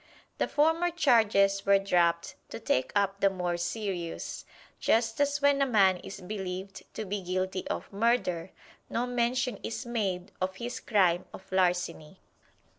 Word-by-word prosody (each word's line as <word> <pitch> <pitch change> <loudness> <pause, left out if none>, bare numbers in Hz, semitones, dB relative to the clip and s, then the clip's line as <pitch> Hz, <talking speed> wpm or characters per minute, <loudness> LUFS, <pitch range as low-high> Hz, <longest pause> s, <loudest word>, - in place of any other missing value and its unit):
The - - +1
former 325 +4 +2
charges 220 - +3
were 200 0 +5
dropped 175 -2 +1 0.2
to - - -6
take 130 - 0
up 200 -1 +1
the 200 - +4
more 180 -2 -2
serious 175 -1 -4 0.3
just 225 +3 +1
as 285 0 +1
when 285 0 +4
a - - +5
man 195 -6 +4
is 195 +2 -9
believed 190 0 -5
to 220 - -4
be 200 +1 -3
guilty 185 +1 -2
of - - -5
murder, 195 -6 +1 0.4
no 240 - -1
mention 245 -1 0
is 230 - -5
made 195 -7 -2
of 190 0 -1
his 240 +4 -5
crime 185 -5 +2
of 190 - -12
larceny. 180 -2 0
195 Hz, 150 wpm, -29 LUFS, 185-235 Hz, 0.4 s, were